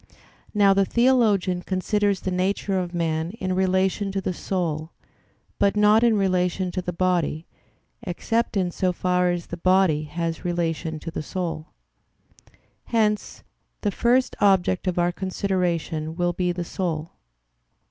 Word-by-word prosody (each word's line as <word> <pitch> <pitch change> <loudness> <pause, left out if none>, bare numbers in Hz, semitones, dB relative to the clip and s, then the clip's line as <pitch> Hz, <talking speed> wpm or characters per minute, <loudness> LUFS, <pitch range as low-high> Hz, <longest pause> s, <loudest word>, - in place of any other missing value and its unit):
Now 200 -1 +5
the 195 0 +3
theologian 215 -6 +2
considers 200 +2 0
the 185 - -2
nature 190 +1 0
of 175 -1 -3
man 165 -2 -1
in 185 -3 -1
relation 190 +2 +1
to 195 - 0
the 185 -1 -2
soul; 165 -4 -2 0.7
but 200 +1 +2
not 210 +2 +5
in 230 -2 +4
relation 185 -1 0
to 185 - -2
the 180 - -3
body, 170 -3 0 0.6
except 225 +3 -1
in 180 -2 0
so 180 +1 0
far 180 0 +1
as 175 -1 -2
the 175 - -7
body 180 -4 +3
has 165 +1 -4
relation 165 -2 -2
to 165 - -6
the - - -4
soul. 165 -1 -4 1.2
Hence 215 -3 0 0.4
the 205 - 0
first 245 +6 +2
object 190 -2 +3
of 180 - 0
our 175 0 +2
consideration 175 -4 -2
will 175 0 0
be 180 0 0
the 175 0 -4
soul. 165 -3 -3
185 Hz, 145 wpm, -24 LUFS, 175-195 Hz, 1.2 s, Now